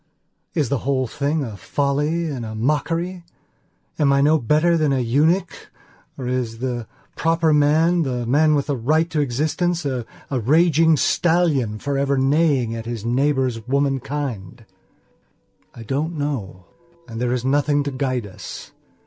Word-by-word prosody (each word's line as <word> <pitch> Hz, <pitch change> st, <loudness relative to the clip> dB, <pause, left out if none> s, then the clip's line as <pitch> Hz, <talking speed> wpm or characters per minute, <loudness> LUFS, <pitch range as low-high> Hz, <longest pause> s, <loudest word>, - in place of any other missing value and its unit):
Is 150 Hz, -8 st, +1 dB
the 140 Hz, -, 0 dB
whole 130 Hz, 0 st, 0 dB
thing 145 Hz, +5 st, -1 dB
a 110 Hz, -5 st, -6 dB
folly 145 Hz, -, -1 dB
and 135 Hz, -6 st, -4 dB
a 110 Hz, -1 st, -6 dB
mockery? 165 Hz, +8 st, -1 dB, 0.8 s
Am 145 Hz, -2 st, +3 dB
I 140 Hz, -, +3 dB
no 150 Hz, +3 st, +4 dB
better 155 Hz, +7 st, +2 dB
than 155 Hz, -3 st, +1 dB
a 135 Hz, -, +1 dB
eunuch 150 Hz, +10 st, 0 dB, 0.5 s
or 130 Hz, -, -5 dB
is 125 Hz, -3 st, -2 dB
the 120 Hz, -2 st, -3 dB, 0.3 s
proper 165 Hz, -1 st, +2 dB
manthe 150 Hz, -3 st, +2 dB
man 150 Hz, +5 st, +3 dB
with 140 Hz, -, 0 dB
the 145 Hz, -, -1 dB
right 155 Hz, +7 st, +1 dB
to 155 Hz, -, 0 dB
existencea 145 Hz, -1 st, -1 dB, 0.2 s
raging 155 Hz, +5 st, +3 dB
stallion 155 Hz, -11 st, +1 dB
forever 140 Hz, +2 st, -1 dB
neighing 135 Hz, -4 st, +2 dB
after 115 Hz, 0 st, -6 dB
his 115 Hz, -2 st, -5 dB
neighbour's 130 Hz, -2 st, 0 dB
womankind? 135 Hz, -5 st, -2 dB, 1.1 s
I 115 Hz, -, -9 dB
don't 150 Hz, +8 st, -2 dB
know. 115 Hz, -11 st, -4 dB, 0.4 s
And 115 Hz, 0 st, -6 dB
there 125 Hz, -1 st, 0 dB
is 125 Hz, 0 st, -2 dB
nothing 145 Hz, +1 st, +2 dB
to 140 Hz, -, -3 dB
guide 130 Hz, -3 st, -2 dB
us. 95 Hz, -, -9 dB
140 Hz, 140 wpm, -21 LUFS, 125-155 Hz, 1.1 s, no